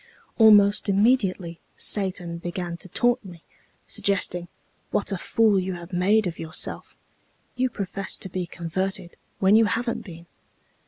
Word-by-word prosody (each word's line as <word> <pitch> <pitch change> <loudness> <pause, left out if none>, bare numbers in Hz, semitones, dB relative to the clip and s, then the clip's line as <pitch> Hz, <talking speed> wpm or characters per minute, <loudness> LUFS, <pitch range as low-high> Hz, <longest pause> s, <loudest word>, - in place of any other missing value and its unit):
Almost 205 -2 +6
immediately 195 -5 +1 0.2
Satan 180 -4 -2
began 175 0 -4
to 185 - -10
taunt 245 +5 +1
me, 175 -4 -12 0.4
suggesting, 180 -3 0 0.4
'What 205 - -1
a 195 - -1
fool 215 -1 +2
you 185 0 -3
have 175 +1 -10
made 200 +5 +3
of 170 -2 -4
yourself! 160 -1 -2 0.6
You 255 +1 +1
profess 195 -3 -4
to - - -6
be 180 -1 -4
converted 185 +2 -4 0.2
when 195 +2 +4
you 225 0 +6
haven't 235 +3 -1
been!' 170 -3 -11
190 Hz, 140 wpm, -24 LUFS, 175-210 Hz, 0.6 s, Almost